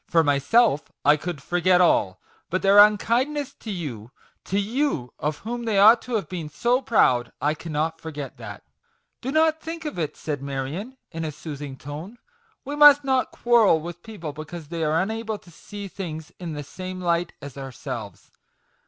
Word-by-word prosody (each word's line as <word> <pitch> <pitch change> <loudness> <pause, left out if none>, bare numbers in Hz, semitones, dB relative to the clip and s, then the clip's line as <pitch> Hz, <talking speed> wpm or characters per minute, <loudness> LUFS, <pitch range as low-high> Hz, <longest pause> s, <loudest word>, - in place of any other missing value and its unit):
For 165 -1 +4
myself, 145 - +3
I 150 +1 +7
could 155 -2 -6
forget 180 +2 +3
all; 100 - +3 0.3
but 185 - -1
their 200 +1 +6
unkind 230 +7 +4
ness 285 -1 -4
to 225 - -8
you 140 - -5 0.4
to 195 - 0
you, 215 - -1
of 150 +1 -2
whom 240 +1 -4
they 220 -3 +1
ought 220 +4 +7
to 250 - -4
have 210 - -1
been 170 -5 -5
so 245 - +1
proud; 130 - +3
I 150 +1 +1
cannot 160 +1 -3
forget 145 -4 -7
that 105 -4 -9 0.3
!" - - -47
"Do 260 - -3
not 315 +1 +3
think 325 0 -6
of 295 -11 -4
it," 155 -3 -3
said 145 -3 -4
Marion, 140 - -5
in 165 -2 -4
a 155 - -3
soothing 145 -2 -7
tone; 155 - -8 0.2
" 455 -2 -39
we 285 +2 -4
must 295 -1 +8
not 265 -2 +1
quarrel 230 -8 +4
with 170 +2 -8
people 175 -9 -7
because 155 +1 -8
they 165 -1 -3
are 155 +1 +2
unable 220 +3 -2
to 180 - -18
see 205 +4 -9
things 160 -5 -7
in 170 -3 -5
the 145 -1 -5
same 185 +5 -7
light 175 -1 0
as 145 -2 -9
ourselves. 135 -3 -7
175 Hz, 190 wpm, -24 LUFS, 150-225 Hz, 0.4 s, must